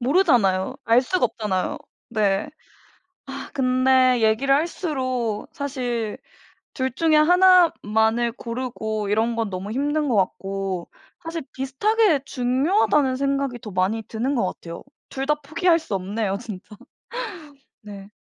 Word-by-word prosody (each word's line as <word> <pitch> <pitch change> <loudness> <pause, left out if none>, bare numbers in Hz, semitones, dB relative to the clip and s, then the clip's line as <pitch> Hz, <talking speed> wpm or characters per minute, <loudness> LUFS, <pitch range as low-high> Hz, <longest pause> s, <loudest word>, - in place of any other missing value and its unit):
모르잖아요. 245 - +2
알 230 +2 +5
수가 360 +8 0
없잖아요. 190 -4 -3 0.3
네. 215 +2 0 0.8
아 - - -7
근데 255 -1 +3
얘기를 225 +6 +3
할수록 260 - -2
사실 245 -6 -3 0.6
둘 260 -2 -1
중에 315 +3 +2
하나만을 305 - +4
고르고 230 -4 -4
이런 225 +3 +1
건 225 -2 -2
너무 190 +3 -5
힘든 295 +4 0
것 245 - +1
같고 195 -1 -2 0.4
사실 330 -1 -4
비슷하게 315 +6 +1
중요하다는 265 - +1
생각이 275 -2 -1
더 215 -2 -9
많이 190 +5 0
드는 240 +6 -2
것 210 -6 +1
같아요. 170 -2 -7 0.2
둘 270 0 -4
다 300 - +3
포기할 335 +4 +2
수 315 -10 -5
없네요 200 +1 -2
진짜. 210 -2 -9 1.1
네. 200 -1 -10
250 Hz, 260 characters per minute, -23 LUFS, 215-280 Hz, 1.1 s, 알